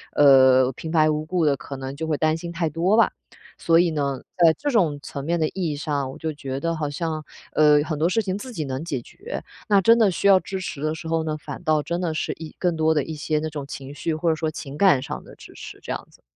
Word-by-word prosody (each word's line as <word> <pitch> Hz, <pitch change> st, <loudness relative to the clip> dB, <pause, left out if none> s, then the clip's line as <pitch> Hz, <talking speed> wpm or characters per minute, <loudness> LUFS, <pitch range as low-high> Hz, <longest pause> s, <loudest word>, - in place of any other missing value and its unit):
呃， 130 Hz, -2 st, +6 dB
平 160 Hz, +5 st, -7 dB
白 155 Hz, -2 st, +4 dB
无 150 Hz, 0 st, -1 dB
故 175 Hz, +1 st, 0 dB
地 140 Hz, -2 st, +2 dB
可 140 Hz, -, -8 dB
能 135 Hz, +1 st, -6 dB
就 160 Hz, -, -4 dB
会 155 Hz, -, 0 dB
担 155 Hz, +1 st, +1 dB
心 170 Hz, +1 st, -6 dB
太 165 Hz, -1 st, -1 dB
多 175 Hz, +7 st, +1 dB
吧。 230 Hz, -, +5 dB, 0.5 s
所 165 Hz, 0 st, +3 dB
以 175 Hz, -1 st, +3 dB
呢， 140 Hz, -4 st, -2 dB, 0.2 s
在 165 Hz, -2 st, +6 dB
这 290 Hz, -1 st, -2 dB
种 170 Hz, -11 st, +2 dB
层 140 Hz, -, -6 dB
面 170 Hz, +1 st, 0 dB
的 155 Hz, -, +2 dB
意 175 Hz, -5 st, -2 dB
义 -, -, -3 dB
上， 145 Hz, -2 st, -2 dB
我 -, -, -10 dB
就 160 Hz, -1 st, -3 dB
觉 135 Hz, -2 st, -5 dB
得 165 Hz, +2 st, -1 dB
好 150 Hz, -2 st, -2 dB
像， 155 Hz, +1 st, -3 dB, 0.3 s
呃， 150 Hz, -1 st, +5 dB
很 155 Hz, -2 st, -4 dB
多 165 Hz, +3 st, +2 dB
事 225 Hz, +4 st, +1 dB
情 190 Hz, -2 st, -2 dB
自 255 Hz, +4 st, -8 dB
己 160 Hz, -, -3 dB
能 135 Hz, +3 st, -4 dB
解 145 Hz, -7 st, -2 dB
决。 465 Hz, +5 st, -8 dB, 0.3 s
那 200 Hz, -1 st, +6 dB
真 230 Hz, +4 st, +6 dB
的 215 Hz, -3 st, +5 dB
需 200 Hz, -, 0 dB
要 190 Hz, -1 st, +7 dB
支 190 Hz, 0 st, -5 dB
持 150 Hz, -6 st, -6 dB
的 155 Hz, +1 st, -1 dB
时 160 Hz, -, -8 dB
候 165 Hz, 0 st, 0 dB
呢， 155 Hz, -1 st, -2 dB
反 150 Hz, -, -8 dB
倒 155 Hz, -3 st, +2 dB
真 170 Hz, +1 st, -3 dB
的 170 Hz, -, -1 dB
是 -, -, -2 dB
一 160 Hz, -1 st, -9 dB
更 175 Hz, -2 st, +1 dB
多 160 Hz, 0 st, +2 dB
的 150 Hz, -, +2 dB
一 160 Hz, -, -6 dB
些 155 Hz, 0 st, -1 dB
那 155 Hz, -, -3 dB
种 145 Hz, -2 st, -6 dB
情 140 Hz, 0 st, -8 dB
绪， 155 Hz, +2 st, -2 dB
或 165 Hz, +2 st, 0 dB
者 160 Hz, -, +2 dB
说 160 Hz, 0 st, -2 dB
情 145 Hz, -1 st, -8 dB
感 190 Hz, -9 st, +5 dB
上 150 Hz, +1 st, -6 dB
的 -, -, -14 dB
支 -, -, -14 dB
持 -, -, -10 dB
这 -, -, -6 dB
样 -, -, -7 dB
子。 -, -, -23 dB
155 Hz, 295 characters per minute, -23 LUFS, 145-170 Hz, 0.5 s, 要